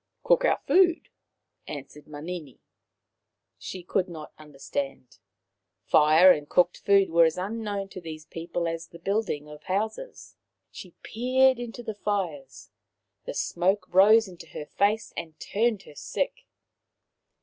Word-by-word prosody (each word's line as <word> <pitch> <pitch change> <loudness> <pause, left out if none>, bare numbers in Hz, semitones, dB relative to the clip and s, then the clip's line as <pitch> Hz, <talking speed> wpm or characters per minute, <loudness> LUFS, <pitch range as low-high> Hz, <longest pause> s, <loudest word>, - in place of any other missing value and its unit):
" - - -52
Cook - - +3
our - - +2
food," 360 -3 +3 0.6
answered 150 0 -9
Manini. 155 -1 -7 1.0
She 185 -1 -7
could 185 +1 -1
not 160 -3 -9
understand. 135 -4 -6 0.7
Fire 155 +5 +6
and 150 -4 -1
cooked 180 0 +2
food 195 -3 +3
were 170 0 +6
as 160 +1 0
unknown 205 0 -3
to 185 - -9
these 155 -2 -8
people 170 +1 -4
as 165 0 -4
the 170 - -13
building 195 -5 -2
of 150 0 -12
houses. 220 - -4 0.3
She - - -11
peered 255 +2 +2
into 240 0 -7
the 220 - -4
fires; 180 - -4 0.5
the - - -5
smoke 185 +5 0
rose 215 +4 +6
into 175 -3 -12
her 150 - -7
face 205 +7 0
and 160 -2 -7
turned 220 -1 0
her - - -14
sick. 145 - -4
180 Hz, 140 wpm, -26 LUFS, 155-210 Hz, 1.0 s, Fire